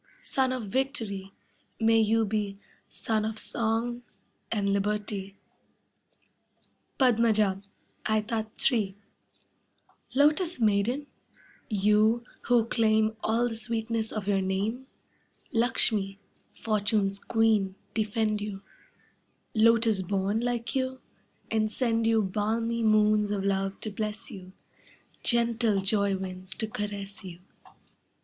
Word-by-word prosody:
Sun 260 -1 +1
of 255 -2 -3
victory, 220 -6 -2 0.5
may 225 0 +4
you 225 +1 +3
be 205 -1 -2 0.3
Sun 220 -1 -1
of 220 0 -3
song 230 +2 -1 0.5
and 200 -3 +1
liberty. 200 -1 -2 1.6
Padmaja, 220 -6 +3 0.5
aetat 215 +1 0
3 210 -6 +2 1.2
Lotus 305 +4 +3
maiden, 225 +6 +1 0.6
you 210 +3 +3 0.2
who 240 -2 +4
claim 220 -1 +2
All 230 +2 +1
the 230 - -4
sweetness 225 0 -2
of 210 -3 -4
your 195 -1 +2
name, 205 +7 -2 0.7
Lakshmi, 220 -4 +2 0.4
fortune's 205 -2 0
queen, 215 -5 +2 0.2
defend 215 -1 0
you, 200 -1 -5 0.9
Lotus 225 -2 +4
born 195 +3 0
like 240 +1 -2
you, 260 0 -1 0.5
and 215 -1 +1
send 230 -2 +1
you 225 -1 +3
Balmy 225 +4 -1
moons 215 -1 +4
of 205 -2 -1
love 195 0 -1
to 215 - -4
bless 210 +1 -5
you, 185 -1 -10 0.7
Gentle 235 -3 +2
joy 200 0 +1
winds 185 0 -6
to 220 - -1
caress 205 -2 -5
you. 175 -2 -9
215 Hz, 105 wpm, -28 LUFS, 200-230 Hz, 1.6 s, may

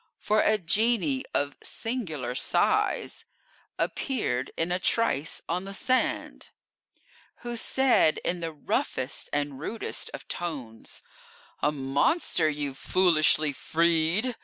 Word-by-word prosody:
For 215 +1 +1
a 215 - +3
genie 235 - +2
of 145 0 0
singular 160 - -4
size 125 - +1 0.5
Appeared 215 - -1
in 165 +2 0
a 180 - +1
trice 180 -7 0
on 180 +3 -2
the 195 0 -5
sand, 255 +4 0 0.9
Who 240 0 -4
said 245 -9 +3
in 180 - 0
the 165 -1 -3
roughest 140 -3 -2
and 145 -2 -2
rudest 220 +9 -3
of - - -9
tones: 135 -10 -6 0.6
"A 150 - +3
monster 150 - +1
you've 145 -2 -4
foolishly 155 -4 +3
freed! 170 - +1
165 Hz, 110 wpm, -27 LUFS, 145-220 Hz, 0.9 s, a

